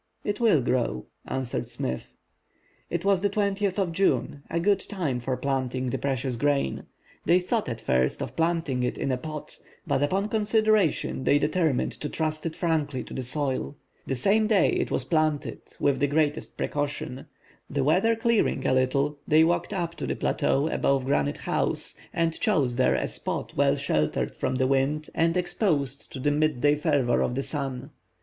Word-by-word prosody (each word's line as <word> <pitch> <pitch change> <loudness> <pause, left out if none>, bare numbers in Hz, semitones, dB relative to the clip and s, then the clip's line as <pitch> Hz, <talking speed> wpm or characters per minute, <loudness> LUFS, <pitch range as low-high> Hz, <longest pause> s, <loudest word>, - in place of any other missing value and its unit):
"It 205 0 -2
will 215 - +4
grow," 120 - 0 0.2
answered 130 -2 -2
Smith. 65 0 -3 0.7
It 170 +2 -2
was 195 -2 +3
now 205 - +2
the 200 - -11
20th 200 -2 0
of 190 -4 0
June, 165 -5 +1
a 170 - 0
good 200 +3 +3
time 170 - -3
for 125 +1 -2
planting 130 -2 -1
the 135 - -2
precious 130 -2 -1
grain. 140 - 0 0.4
They 175 +3 +5
thought 205 - -1
at 115 -2 -4
first 65 -6 +1
of - - -5
planting 165 -6 0
it 125 - -1
in 135 - -1
a 130 - +1
pot; 155 +3 -8 0.3
but 135 - 0
upon 190 +8 +1
consideration, 215 - +2
they 145 - +4
determined 150 -2 +1
to 150 - -2
trust 155 0 -2
it 160 - -5
frankly 150 -6 -1
to - - -10
the 130 - -3
soil. 135 +2 -2 0.3
The 135 - -1
same 205 - +3
day 210 -3 +4
it - - 0
was - - -1
planted, 155 -3 0 0.2
with 140 -2 +2
the 145 - +3
greatest 150 0 0
precaution. 145 -1 -3 0.4
The 140 -1 0
weather 190 +11 +3
clearing 225 - +1
a - - +3
little, 140 +3 +1
they 155 +1 +6
walked 170 +4 +1
up 175 -4 -2
to - - -4
the - - -1
plateau 140 +3 +1
above 135 -4 +1
Granite 140 +1 +1
House, - - -1 0.2
and 165 -1 0
chose 145 - +2
there 130 +1 +3
a - - 0
spot - - -5
well 140 0 +3
sheltered 80 - 0
from 130 0 -1
the 130 0 +2
wind, 140 +3 0
and 165 +2 +2
exposed 160 - -1
to 135 - -7
the 145 +3 +1
midday 145 -1 +2
fervor 145 -5 +1
of 125 - 0
the 135 - -1
sun. 135 -4 -4
145 Hz, 180 wpm, -26 LUFS, 130-175 Hz, 0.7 s, they